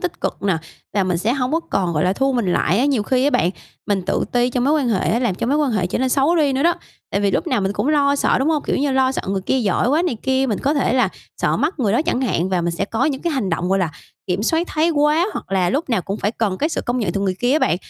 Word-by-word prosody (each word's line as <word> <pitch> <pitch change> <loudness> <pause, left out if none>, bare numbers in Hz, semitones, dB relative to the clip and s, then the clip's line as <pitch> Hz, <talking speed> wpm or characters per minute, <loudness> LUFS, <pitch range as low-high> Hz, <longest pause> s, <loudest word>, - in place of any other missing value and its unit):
tích 355 -1 -4
cực - - -3
nè 195 -4 +1 0.4
và 200 -2 +2
mình 180 -2 0
sẽ 220 +7 0
hổng 260 0 -1
có 325 - +2
còn, 185 - -1
gọi 150 0 0
là, 180 - +2
thu 270 +6 0
mình 225 -8 0
lại 185 - +1
á. 250 - +2
Nhiều 275 -6 +1
khi 255 +4 +1
á 290 - +3
bạn, 175 - +2 0.4
mình 200 -2 0
tự 180 - -1
ti 245 0 +2
trong 250 0 0
mối 285 - +3
quan 285 -5 +1
hệ 205 -5 +1
á, 230 - +2
làm 240 -6 0
cho 185 - -3
mối 275 +4 +2
quan 295 -3 +1
hệ 195 -5 0
trở 180 - -2
nên 260 +1 +1
xấu 280 +6 +2
đi 295 -4 +2
nữa 265 +1 0
đó, 340 +2 +3 0.4
tại 200 - 0
vì 200 -1 +2
lúc 330 - -1
nào 255 -9 +1
mình 195 +1 -1
cũng 260 - -1
lo 285 -2 +3
sợ, - - +2
đúng 270 +4 +1
hông? 310 -3 +1
Kiểu - - -1
như 280 0 0
lo 265 0 +2
sợ - - -3
người 195 0 -1
kia 265 +7 0
giỏi 215 0 +1
quá 300 +5 +2
này 345 -9 -1
kia, 265 0 +1
mình 215 -6 -1
có 285 +3 0
thể 275 -5 +1
là 255 0 +3 0.3
sợ - - 0
mất 310 +3 -1
người 215 -7 +1
đó 235 - +2
chẳng 325 -6 -1
hạn 190 -8 0
và 185 -2 0
mình 170 0 -1
sẽ 195 - -1
có 225 +5 -1
những 275 -3 -1
cái 340 - -1
hành 245 -10 -1
động, 170 +2 -1
gọi 195 +1 +2
là, 175 -4 0 0.4
kiểm 185 +2 -1
soát 325 +9 +1
thái 315 0 +1
hóa, 305 +2 +2
hoặc 195 - -7
là 185 -2 +2
lúc 290 +3 -1
nào 225 -6 +1
cũng 200 +4 -4
phải 205 - 0
cần 210 -5 -2
cái 305 - +1
sự - - -2
công 245 +1 -2
nhận 205 -8 -1
từ 200 - -2
người 190 -2 0
kia 245 +1 +2
á 305 - +4
bạn. 170 - +2
250 Hz, 330 wpm, -20 LUFS, 195-285 Hz, 0.4 s, á